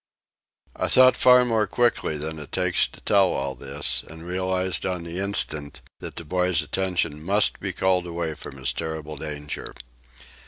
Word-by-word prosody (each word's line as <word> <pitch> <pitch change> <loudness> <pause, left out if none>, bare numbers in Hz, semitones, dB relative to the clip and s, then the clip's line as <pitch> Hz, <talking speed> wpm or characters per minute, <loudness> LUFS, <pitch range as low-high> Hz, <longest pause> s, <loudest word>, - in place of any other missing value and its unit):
I - - -1
thought 130 0 +6
far 125 0 +6
more 110 -3 +1
quickly 120 -8 0
than 80 +1 -5
it 75 - -9
takes - - +2
to - - -15
tell 100 -3 +3
all 70 0 -2
this, 70 +3 -2
and 80 +1 -11
realized 95 +1 -1
on 90 -2 -2
the 85 +2 -5
instant 80 -7 0 0.2
that - - -8
the 85 - -6
boy's 90 -1 +1
attention 85 -2 -1
must 100 +4 +2
be 95 - -3
called 90 -1 +1
away 85 -2 -3
from 70 - -9
his 65 -2 -1
terrible 80 -1 -5
danger. 75 0 -6
85 Hz, 165 wpm, -24 LUFS, 75-95 Hz, 0.2 s, thought